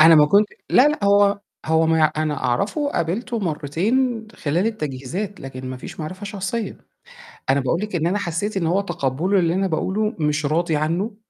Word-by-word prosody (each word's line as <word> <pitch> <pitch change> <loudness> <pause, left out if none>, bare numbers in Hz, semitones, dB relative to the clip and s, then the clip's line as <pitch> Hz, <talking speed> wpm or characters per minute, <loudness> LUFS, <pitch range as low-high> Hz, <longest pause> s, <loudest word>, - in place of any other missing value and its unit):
أنا 160 +1 +9
ما 150 -1 +7
كنتش 205 +6 +3 0.2
لا، 265 +4 +6
لأ، 300 -8 -2
هو 200 0 +4 0.3
هو 160 0 +3
ما 160 0 +3
ي - - +4
أنا 155 -1 0
أعرفه 200 - 0
وقابلته 235 - -1
مرّتين 215 - 0
خلال 165 +7 0
التجهيزات، 180 - -4
لكن 130 -1 -7
ما 130 - -5
فيش 125 - -9
معرفة 185 +6 -6
شخصية. 205 +2 -3 0.7
أنا 135 +1 +4
باقول 140 +7 0
لِك 210 -3 -4
إن 165 -1 +1
أنا 190 +4 +1
حسّيت 200 +2 -2
إن 170 -4 0
هو 185 +4 +2
تقبٌّله 175 +1 0
للي 170 0 +1
أنا 195 +1 +1
باقوله 195 +6 -1
مش 150 0 0
راضي 160 +2 +1
عنّه، 170 +8 -1
175 Hz, 185 wpm, -22 LUFS, 155-205 Hz, 0.7 s, أنا